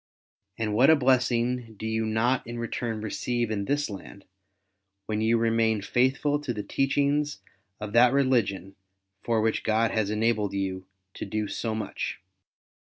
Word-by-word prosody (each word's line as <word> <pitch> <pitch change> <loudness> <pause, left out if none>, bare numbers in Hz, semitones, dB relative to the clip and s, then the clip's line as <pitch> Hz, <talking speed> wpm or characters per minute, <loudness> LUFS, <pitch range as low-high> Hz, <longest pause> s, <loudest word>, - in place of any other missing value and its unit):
And 110 -2 -1
what 125 +7 +5
a 160 - +8
blessing 125 -3 +1
do 110 - -6
you 110 0 -1
not 120 +4 +1
in 120 0 -6
return 115 -1 -3
receive 120 +1 -2
in 100 -2 -2
this 145 +3 0
land, 100 -1 -10 0.8
when 110 0 -2
you 115 +1 +3
remain 115 -2 +2
ftiithful 135 +6 +1
to 140 -4 -3
the 105 - -4
teachings 145 +4 0 0.4
of 105 0 -6
that 120 +1 +6
religion 110 -9 +1 0.5
for 115 -1 +1
which 110 0 0
God 110 +1 +2
has 110 -3 0
enabled 105 -2 0
you 95 -1 -3 0.3
to - - -6
do 105 +1 -2
so 110 +2 -3
much 110 - -4
115 Hz, 150 wpm, -27 LUFS, 110-125 Hz, 0.8 s, a